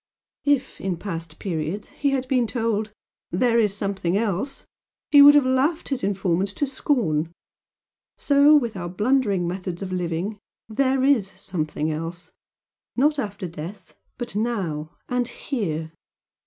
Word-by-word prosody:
If, 280 -2 +1
in 185 -2 -2
past 165 -4 -6
periods, 175 +2 -3
he 285 - -1
had 265 -2 -1
been 255 -3 +2
told 220 -2 -1 0.4
'there 235 +6 +2
is 205 -3 +2
something 195 -3 -1
else' 215 +5 -2 0.5
he 285 - +9
would 290 +1 +10
have 290 -3 +5
laughed 270 +6 +1
his 270 -6 -2
informant 195 -1 0
to 290 - +1
scorn. 215 - 0 0.9
So 285 +1 +5
with 235 -7 +2
our 175 -2 -4
blundering 205 -2 +1
methods 180 0 -4
of 185 - -5
living 180 +3 -2 0.3
'there 260 +3 +1
is 255 -9 +3
something 155 -3 -2
else' 165 +3 -5 0.6
not 295 +3 +3
after 205 -5 -4
death, 175 +4 -9 0.2
but 240 -5 -5
NOW 190 -9 -1 0.2
and 245 -1 0
HERE. 165 - -3
205 Hz, 140 wpm, -24 LUFS, 175-260 Hz, 0.9 s, would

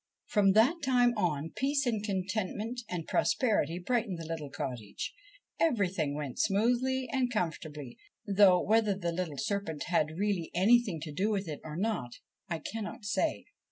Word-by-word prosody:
From 195 -3 +3
that 255 - +4
time 245 -2 +4
on, 165 -6 -1
peace 275 +1 +1
and 220 -4 0
contentment 205 +4 -2
and 170 -3 -3
prosperity 210 -8 +1
brightened 215 0 -1
the 165 - -7
little 160 -3 -5
cottage. 125 -8 -5 0.5
Everything 185 - +1
went 145 -4 -5
smoothly 250 +5 +2
and 255 -2 +1
com 180 -8 +1
fortably, 150 -7 -9 0.3
though 195 -2 +6
whether 215 0 +2
the 170 -3 -2
little 165 -4 -3
serpent 160 +1 -2
had 155 -2 +1
really 195 -4 0
anything 205 -1 +4
to 155 0 -5
do 190 +8 0
with 200 -3 -1
it 150 -2 -5
or 155 -1 -7
not, 190 - -1 0.4
I 170 - -1
cannot 215 +4 -6
say. 305 +10 0
195 Hz, 160 wpm, -31 LUFS, 160-225 Hz, 0.5 s, though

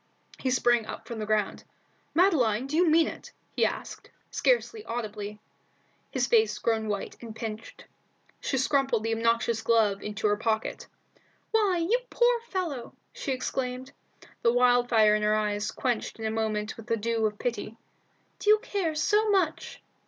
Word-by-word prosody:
He 260 - -1
sprang 240 -3 +2
up - - -8
from 235 -2 -5
the 215 - -4
ground. 215 -2 0 0.5
"Madeline, 265 - +3
do 280 +3 -4
you 345 0 +4
mean 320 +1 +5
it?" - - -8 0.2
he - - +2
asked, - - -3 0.2
scarcely 465 -3 +1
audibly, 210 -3 -5 0.7
his 255 -2 0
face 220 -3 +3
grown 225 -1 0
white 205 -2 -3
and 225 -2 -8
pinched. 225 -1 -7 0.5
She 270 - -1
crumpled 270 -6 +1
the 225 0 0
obnoxious 230 0 +1
glove 220 -3 +2
into 210 +1 -5
her 205 0 +3
pocket. 220 0 -2 0.6
"Why, 415 -5 +3
you 475 +6 +3
poor 480 0 +3
fellow!" 330 -10 -3 0.2
she 275 - -4
exclaimed, 255 0 -3 0.5
the 235 - +4
wildfire 245 -3 +4
in 210 - +1
her 210 0 +3
eyes 210 0 -1
quenched 245 -4 -2
in 220 - -4
a 220 - 0
moment 220 -1 -2
with 225 0 -11
the 230 - +1
dew 225 0 0
of 210 -1 -6
pity. 230 -1 -4 0.6
"Do 415 - 0
you 425 - +8
care 400 -8 -2
so 420 +7 +2
much?" 375 -6 0
230 Hz, 160 wpm, -28 LUFS, 215-280 Hz, 0.7 s, you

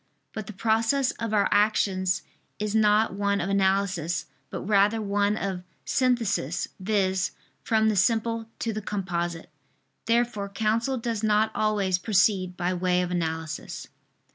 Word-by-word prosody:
But 215 -3 -6
the 215 - -7
process 225 +6 +1
of 230 -1 -3
our 205 -2 +3
actions 195 -3 +2 0.3
is 210 0 -2
not 215 -1 +3
one 200 0 0
of 185 +3 -2
analysis, 190 -3 +1 0.2
but - - -5
rather 205 +2 +3
one 205 0 +1
of 190 -2 -3 0.2
synthesis, 230 - 0
viz. 190 -2 0 0.3
from 220 -1 +2
the 215 - +2
simple 225 +3 +1
to 225 - -2
the 215 - -4
composite. 175 -5 -3 0.6
Therefore 230 -3 +1
counsel 225 +5 0
does 230 -2 -2
not 215 0 +3
always 200 -4 +1
proceed 185 -2 +2
by 180 0 0
way 180 0 +1
of 180 - -4
analysis. 160 -2 -4
205 Hz, 140 wpm, -26 LUFS, 185-220 Hz, 0.6 s, our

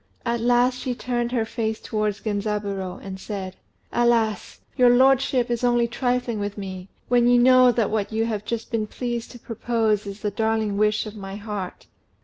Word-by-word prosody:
At 235 0 0
last 245 +1 +3
she 250 -2 -3
turned 240 -1 -2
her 235 -3 0
face 220 -1 -2
towards 215 -1 -2
Genzaburô, 205 -3 -2
and 190 -1 -7
said 190 -2 -6 0.4
"Alas! 230 -4 +1
your 250 -1 +5
lordship 260 -1 +4
is 240 0 -1
only 240 -1 +3
trifling 245 -2 -1
with 205 0 -4
me, 190 -1 -7 0.2
when 240 -1 +4
you 245 0 +5
know 255 0 +6
that 230 -4 0
what 210 -1 -1
you 220 +1 0
have 215 -3 -3
just 230 +1 -4
been 220 -2 -1
pleased 240 0 -4
to 245 - -11
propose 225 -3 -1
is 200 +1 -7
the 210 - -1
darling 220 0 0
wish 215 +1 +2
of 215 0 -8
my 195 -1 -7
heart. 205 -3 -6
225 Hz, 180 wpm, -24 LUFS, 205-240 Hz, 0.4 s, know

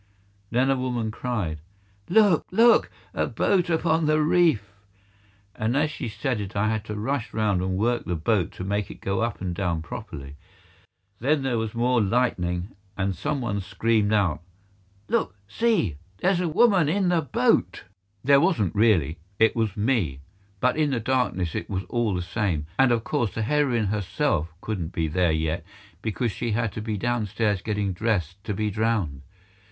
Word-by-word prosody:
Then 130 +3 +2
a - - +3
woman 125 -4 -2
cried, 110 -10 -3 0.5
"Look! 200 -3 +4
Look! 230 +5 +5 0.2
a - - 0
boat 180 -3 +1
upon 160 -1 +2
the 155 0 +3
reef!" 150 - +2 0.8
And 115 +5 0
as 150 +1 +1
she 130 -5 -5
said 120 0 -2
it 100 0 -7
I 105 +2 +2
had 110 -1 -1
to 105 - -5
rush 115 +3 -2
round 105 -4 +1
and 95 0 -1
work 120 +4 0
the 90 - -1
boat 90 +2 0
to - - -7
make 100 0 -1
it - - -10
go 95 +2 -1
up 115 -3 -2
and 90 -2 -2
down 85 -4 -1
properly. 70 -2 -8 0.8
Then 140 +3 +1
there 125 -4 0
was 110 0 -3
more 120 +1 +2
lightning, 95 -5 0 0.3
and 95 0 0
some 140 - -2
one 100 -4 -2
screamed 110 +2 +1
out, 95 -8 +2 0.7
"Look! 95 - 0
See! 165 - +1 0.2
there's 180 - +2
a 180 -2 0
woman 190 -3 +4
in 185 +2 +1
the 175 -2 +3
boat!" 145 - +1 0.4
There 140 +1 +5
wasn't 110 - +1
really; 90 -8 +2 0.2
it 110 +1 +4
was 110 -2 -1
me; 105 - 0 0.4
but 125 +6 +2
in 155 -2 +2
the 130 -4 0
darkness 115 -8 0
it 85 - -4
was 95 -1 -2
all 115 -5 0
the 90 - -2
same, 90 -5 -1
and 135 -2 +5
of 115 -2 +1
course 110 -5 -1
the 115 - -1
heroine 125 -3 +1
herself 100 - -1
couldn't 95 -6 -4
be 80 -1 0
there 85 +2 +2
yet 80 +1 -1 0.4
because 110 +2 -1
she 115 +3 -3
had 115 -1 0
to 110 - -6
be 110 -1 -3
downstairs 110 -3 0
getting 105 -2 -1
dressed 100 -3 -1
to 105 - -2
be 105 +1 -1
drowned. 105 -10 -1
110 Hz, 175 wpm, -25 LUFS, 95-130 Hz, 0.8 s, Look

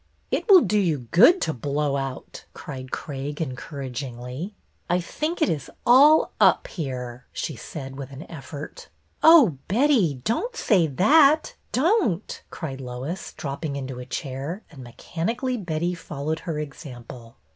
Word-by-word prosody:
" - - -41
It - - -1
will 380 -3 +9
do 210 -6 +1
you 155 - 0
good 250 - +7
to 160 - 0
blow 140 +2 -1
out," 135 -1 -5
cried 130 -2 -8
Craig, 145 0 -5
encouragingly. 130 - -5 0.2
" - - -43
I 175 +1 +3
think 310 - -2
it - - +3
is 150 -3 -2 0.2
all 285 +6 +6
up - - +5
here," 125 -5 -6
she 155 - -4
said, 135 +3 -8
with 135 -2 -7
an 135 +3 -8
effort. 145 -1 -9 0.2
" - - -42
Oh, 280 - +7
Betty, 220 - +3
don't 460 - -1
say 185 - +3
that, 290 - +4 0.2
don't! 265 - +1
" - - -41
cried 135 -5 -6
Lois, 130 +8 -5
dropping 140 +1 -4
into 130 -2 -5
a 125 - -7
chair, 140 - -5
and 135 -5 -11
mechanically 225 - -3
Betty 175 -4 -2
followed 155 -1 -4
her 165 -4 -4
example. 125 -5 -9
155 Hz, 155 wpm, -24 LUFS, 135-210 Hz, 0.2 s, will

